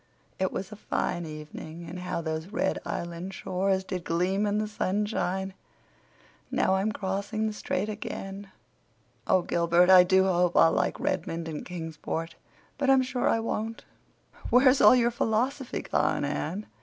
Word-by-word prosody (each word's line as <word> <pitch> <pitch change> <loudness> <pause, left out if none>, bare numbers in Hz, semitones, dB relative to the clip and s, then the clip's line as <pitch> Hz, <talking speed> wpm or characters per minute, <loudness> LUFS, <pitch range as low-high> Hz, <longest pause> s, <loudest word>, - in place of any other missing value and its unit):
It 190 0 +1
was 190 +2 -5
a - - -7
fine 175 -4 -2
evening; 155 +2 -8
and 175 +2 -7
how 180 -1 -3
those 160 0 -3
red 220 +6 -1
Island 170 +3 -5
shores 190 +1 0
did 185 -2 -5
gleam 185 +5 0
in 205 0 0
the 215 0 0
sunshine. 190 -2 -1 1.0
Now - - +2
I'm 200 +3 0
crossing 200 +2 -2
the 215 - -1
strait 205 -1 -2
again. 200 -2 -6 0.8
Oh, 185 -1 +3
Gilbert, 170 +2 +3
I 185 -1 +9
do 190 +1 +4
hope 180 -2 +2
I'll 165 - +7
like - - 0
Redmond 165 -2 -2
and 155 -2 -5
Kingsport, 165 -1 -5 0.5
but 275 -1 +1
I'm 265 -1 +6
sure 255 -1 0
I 225 - +2
won't!" 225 0 -3 0.6
"Where's 255 +2 +5
all - - +8
your 240 -1 +3
philosophy 240 +4 -1
gone, - - +1
Anne?" 190 +7 -3
190 Hz, 155 wpm, -28 LUFS, 170-215 Hz, 1.0 s, I